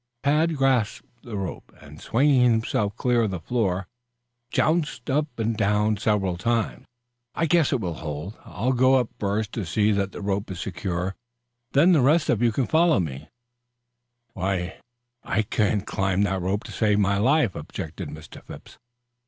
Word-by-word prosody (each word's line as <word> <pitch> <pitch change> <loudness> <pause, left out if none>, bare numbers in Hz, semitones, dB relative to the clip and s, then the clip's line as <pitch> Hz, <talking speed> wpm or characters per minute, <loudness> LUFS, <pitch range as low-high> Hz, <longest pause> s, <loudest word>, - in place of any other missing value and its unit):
Tad 155 +3 +2
grasped 130 -5 +1
the 115 -4 -6
rope, 95 -3 -6
and 75 +2 -13
swinging 135 +2 +3
himself 110 -2 -1
clear 125 -2 +2
of 110 - +1
the 95 -2 -4
floor, 95 -1 -1 0.6
jounced 150 -5 0
up 145 -2 -1
and 115 0 -1
down 105 +1 +2
several 100 -4 0
times. 115 +2 -1 0.5
"I 165 - +1
guess 165 -2 +3
it 135 - +1
will 90 -4 -2
hold. 80 +5 -6
I'll 120 +8 -1
go 130 +1 +4
up 125 -3 +1
first 105 +1 -1
to 115 - -3
see 105 +5 +1
that 100 -1 0
the - - -8
rope 100 +1 -2
is 95 -3 -6
secure; 95 -1 -3 0.6
then 155 +7 +5
the 160 -6 +5
rest 150 +3 +3
of 115 - 0
you 120 -1 +3
can 125 +4 0
follow 165 - +3
me 75 -4 -4
up." - - -29 1.0
"Why, 95 -1 -2 0.4
I 110 - 0
couldn't 105 -1 0
climb 95 0 0
that 95 -2 0
rope 95 +4 -1
to - - -9
save 105 -2 +2
my 100 -1 +2
life," 130 -2 +3
objected 80 +2 -6
Mr. 80 0 -11
Phipps. - - -12
105 Hz, 170 wpm, -25 LUFS, 95-125 Hz, 1.0 s, then